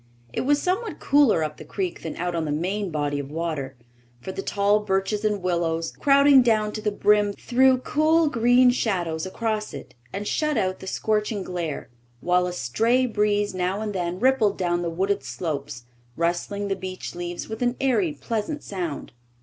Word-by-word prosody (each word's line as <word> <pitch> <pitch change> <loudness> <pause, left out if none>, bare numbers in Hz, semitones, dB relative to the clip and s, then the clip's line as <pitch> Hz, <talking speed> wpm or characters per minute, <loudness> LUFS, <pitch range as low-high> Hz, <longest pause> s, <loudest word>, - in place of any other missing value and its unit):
It - - -1
was 290 +2 +2
somewhat 385 +7 -2
cooler 275 - +4
up 150 -1 -4
the - - -9
creek 185 -3 -4
than 160 - -5
out 175 0 -2
on 165 -1 -1
the 150 - -2
main 185 +6 -1
body 145 -2 -1
of 140 -1 -6
water, 155 -4 -3 0.4
for 190 - -6
the 195 - -4
tall 205 +1 +2
birches 200 +1 -1
and 210 -3 0
willows, 165 -2 0
crowding 280 -1 +5
down 215 -3 +2
to 215 - -5
the 210 - +1
brim, 205 0 +3
threw 260 +4 +3
cool, 310 +5 +2
green 245 -1 +4
shadows 180 -9 -1
across 215 +1 -3
it - - -10 0.2
and 205 +1 -4
shut 305 -3 0
out 185 -3 0
the 190 - -9
scorching 210 0 -1
glare, 170 -8 -4 0.3
while 180 +3 +2
a - - -3
stray 230 - +1
breeze 205 -3 +1
now 185 +2 -1
and 215 -1 -3
then 180 -1 -2
rippled 240 -4 +3
down 175 -1 0
the 170 - -1
wooded 190 0 -1
slopes, 140 0 -4 0.3
rustling 175 +4 -1
the 195 - 0
beech 185 -1 -6
leaves 175 0 -5
with 220 +1 -6
an 245 0 +1
airy, 270 +6 +2
pleasant 285 +1 -4
sound. 175 -7 -5
200 Hz, 180 wpm, -24 LUFS, 175-230 Hz, 0.4 s, crowding